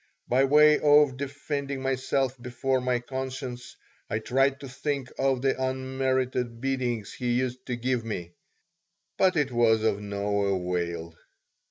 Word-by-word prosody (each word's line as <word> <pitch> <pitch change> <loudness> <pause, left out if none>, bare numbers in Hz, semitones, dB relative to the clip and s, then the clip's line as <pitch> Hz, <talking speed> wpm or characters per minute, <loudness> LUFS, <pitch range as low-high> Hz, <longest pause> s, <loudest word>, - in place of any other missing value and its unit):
By 130 +2 +3
way 150 +2 +6
of 145 -2 +5
defending 140 0 -4
myself 135 0 0
before 130 +2 -1
my 125 0 +1
conscience, 130 -1 -6 0.3
I - - 0
tried 135 +4 +1
to 140 - -7
think 135 0 -3
of 135 -2 +1
the 135 -1 +1
unmerited 130 -2 -1
beatings 125 -4 -2
he 125 -1 -1
used 130 +1 -2
to 125 - -1
give 125 0 -1
me. 90 -6 -5 0.9
But 185 -1 +4
it 145 -4 +1
was 115 -2 +3
of 105 -2 +1
no 100 0 -1
avail. 85 -2 -3
130 Hz, 140 wpm, -27 LUFS, 120-135 Hz, 0.9 s, way